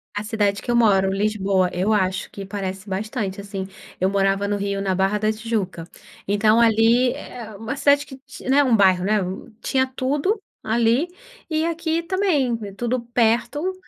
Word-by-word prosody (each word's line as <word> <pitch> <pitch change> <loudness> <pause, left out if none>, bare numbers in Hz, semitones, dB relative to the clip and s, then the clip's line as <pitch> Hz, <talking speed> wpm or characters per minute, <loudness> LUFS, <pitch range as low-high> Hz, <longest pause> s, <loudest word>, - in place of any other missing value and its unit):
A 205 - -2
cidade 205 -2 0
que - - -10
eu 240 - +2
moro, 195 -5 +4
Lisboa, 195 -2 +1
eu 185 +5 0
acho 190 -3 0
que 195 -1 -8
parece 190 0 -5
bastante 200 0 -3
assim. 195 -1 -5 0.3
Eu 185 +1 +2
morava 195 0 +1
no 205 0 0
Rio, 200 0 -2
na 195 -1 0
Barra 195 +3 +1
da 215 +1 +1
Tijuca, 215 -6 -3 0.4
então 215 +3 +3
ali 230 +2 +4
é 220 -3 -9
uma 225 +6 -5
cidade 285 +1 +3
que, 265 - -11 0.3
né, 280 +2 +5
um 250 -4 +3
bairro, 185 -2 +4
né, 210 +2 +2 0.4
tinha 260 -1 +1
tudo 280 - -1 0.2
ali 235 +7 +2 0.4
e 315 0 0
aqui 335 0 -1
também, 335 -10 +1
é 200 - -6
tudo 240 +4 -2
perto 240 +9 0
215 Hz, 170 wpm, -22 LUFS, 195-255 Hz, 0.4 s, né